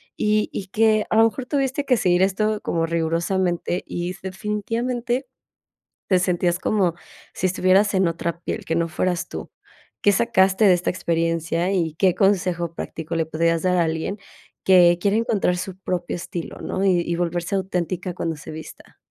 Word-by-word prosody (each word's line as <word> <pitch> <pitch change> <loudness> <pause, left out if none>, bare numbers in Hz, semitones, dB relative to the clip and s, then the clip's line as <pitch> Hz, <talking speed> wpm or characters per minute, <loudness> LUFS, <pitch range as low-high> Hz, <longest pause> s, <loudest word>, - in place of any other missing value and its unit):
y 210 0 +1
y 195 - -4
que, 215 +1 +2
a 220 - +1
lo 225 - +7
mejor, 245 +3 -2
tuviste 275 0 -1
que 250 -3 +3
seguir 180 -2 +3
esto 210 +2 0
como 165 -1 0
rigurosamente 170 +2 -1
y, 175 0 -4
def 185 - -16
definitivamente, 235 +6 -2 0.8
te 185 -2 +3
sentías 175 -1 +1
como 190 -5 +1 0.4
si 185 - 0
estuvieras 185 +3 +3
en 190 -2 +3
otra 170 0 -3
piel, - - -4
que 165 - -1
no 170 0 +1
fueras 175 +2 -1
tú. - - -7 0.5
Qué 205 - +5
sacaste 195 -1 +3
de 190 - +7
esta 175 0 0
experiencia 165 0 0
y 165 -4 0
qué 185 +1 +2
consejo 180 -4 +1
práctico 165 0 -5
le 165 -1 +1
podrías 165 +1 0
dar 180 -1 +2
a 175 - +4
alguien 160 +5 -2 0.5
que 175 -2 +6
quiere 200 +2 +2
encontrar 215 -5 +1
su 185 +1 -5
propio 180 -2 -3
estilo, 175 -1 -6
¿no?, 190 - -2
y 180 -2 +3
y 170 - -1
volverse 175 +2 -2
auténtica 185 -1 -2
cuando 165 -2 -3
se - - -9
vista. 155 0 -11
185 Hz, 175 wpm, -22 LUFS, 170-205 Hz, 0.8 s, lo